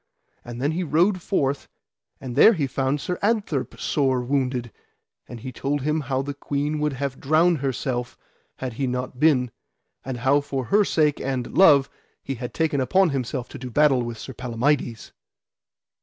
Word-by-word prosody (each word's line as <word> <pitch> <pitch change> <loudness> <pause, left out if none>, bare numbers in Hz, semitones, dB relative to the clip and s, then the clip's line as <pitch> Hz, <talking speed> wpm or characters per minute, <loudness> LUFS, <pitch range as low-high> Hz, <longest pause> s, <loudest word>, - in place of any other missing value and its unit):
And 120 0 -8
then 140 +4 0
he 175 +3 -2
rode 175 +5 +2
forth, 140 -7 -1 0.5
and 125 -3 -7
there 220 +11 +7
he 155 -8 0
found 135 +2 -1
Sir 180 +5 -4
Adtherp 205 - -1
sore 130 -4 +1
wounded, 125 -2 -1 0.6
and 120 -2 -9
he 130 - -6
told 140 +3 -2
him 155 +2 0
how 135 -1 -2
the 145 +1 -4
queen 145 +2 -2
would 150 -1 0
have 135 0 -4
drowned 160 +3 +3
herself 130 -2 -3 0.4
had 130 -2 -5
he 135 +3 -2
not 125 0 -4
been, 135 -6 +3 0.5
and 130 -1 -4
how 135 +4 +3
for 135 -3 -4
her 210 +1 +6
sake 150 -6 +1
and 130 -3 -3
love 145 -8 +6 0.4
he 135 - -3
had 125 -1 -6
taken 155 -4 0
upon 185 +6 +3
him 135 -1 0
to 125 +1 -6
do 125 0 -6
battle 140 0 +3
with 120 -1 -5
Sir 130 - -8
Palamides. 125 0 -1
135 Hz, 170 wpm, -24 LUFS, 125-150 Hz, 0.6 s, there